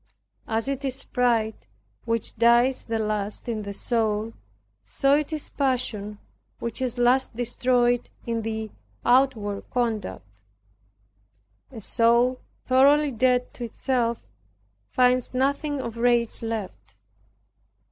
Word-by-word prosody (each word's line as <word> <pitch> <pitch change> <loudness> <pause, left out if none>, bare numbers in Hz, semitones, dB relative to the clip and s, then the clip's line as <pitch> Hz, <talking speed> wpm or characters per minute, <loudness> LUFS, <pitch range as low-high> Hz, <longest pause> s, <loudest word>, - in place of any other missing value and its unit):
As 225 +2 -1
it 275 0 -3
is 270 0 0
pride 225 - 0 0.4
which 230 -1 -1
dies 235 +3 +3
the 225 -1 -2
last 215 -1 -3
in 225 -2 -2
the 200 -1 -6
soul, 220 0 0 0.5
so 275 - +1
it 300 +1 -1
is 310 -2 -5
passion 240 -7 -1 0.4
which 235 +1 -4
is 250 -1 -2
last 245 0 +2
destroyed 245 0 +1 0.2
in 230 -1 -2
the 220 -1 -4 0.3
outward 240 -6 +2
conduct. 225 - -2 1.5
A 225 - -9
soul 235 +4 +2 0.2
thoroughly 280 +3 +4
dead 250 +1 +1
to 245 - -7
itself, 235 0 -1 0.6
finds 250 0 +2
nothing 280 +2 0
of 235 -3 -5
rage 235 -1 +2
left. 190 - -6
240 Hz, 115 wpm, -25 LUFS, 220-255 Hz, 1.5 s, thoroughly